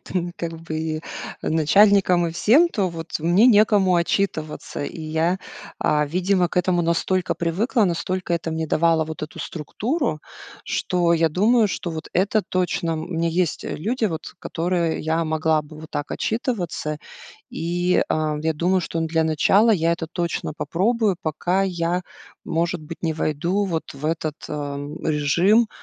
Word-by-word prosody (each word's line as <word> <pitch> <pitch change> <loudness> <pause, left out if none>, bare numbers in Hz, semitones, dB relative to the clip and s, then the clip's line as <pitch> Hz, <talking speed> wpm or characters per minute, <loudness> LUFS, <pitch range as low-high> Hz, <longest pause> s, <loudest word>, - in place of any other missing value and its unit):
ты 175 -1 -3
как 170 -1 -4
бы 155 -1 -3 0.4
начальником 180 +2 +4
и 165 - -4
всем, 265 - +5
то 200 - 0
вот 165 -2 -8
мне 175 +9 +4
некому 205 -4 +5
отчитываться. 170 -5 -1
И 165 - -7
я, 160 +3 0 0.4
а, 150 0 +2
видимо, 180 +3 +1
к - - -10
этому 180 -1 +2
настолько 170 +2 0
привыкла, 205 +7 +1
настолько 180 0 -1
это 165 -1 -3
мне 160 0 -2
давало 165 +1 +2
вот 160 0 -7
эту 155 - -7
структуру, 215 - -2 0.4
что 175 -2 +1
я 165 -1 +3
думаю, 215 +7 +3
что 180 - -4
вот 160 -1 -6
это 200 +3 +2
точно 180 -3 -1
м, 160 - -3
у - - -10
меня 170 -2 0
есть, 170 0 0
э, - - -4
люди, 225 - 0
вот, 160 -5 -5
которые 170 -1 -1
я 160 +1 0
могла 155 0 +1
бы 150 +1 -13
вот 160 - -11
так 145 - -4
отчитываться, 180 - -2 0.5
и, 175 +2 +1
а, 155 -1 0
я 160 0 0
думаю, 180 +4 +2
что, 165 -1 -3
ну, 165 - 0
для 160 0 +1
начала 190 +8 +4
я 170 -5 +3
это 170 -1 -3
точно 170 -3 -2
попробую, 210 +2 +1
пока 175 +5 0
я, 175 -1 -1 0.4
может 170 0 -1
быть, 160 +2 -9
не 160 -2 0
войду 170 +6 0
вот 165 -5 -3
в 140 +2 -10
этот, 155 -2 -1
ам, 145 0 -5
режим 170 +10 +3
170 Hz, 165 wpm, -23 LUFS, 160-185 Hz, 0.5 s, всем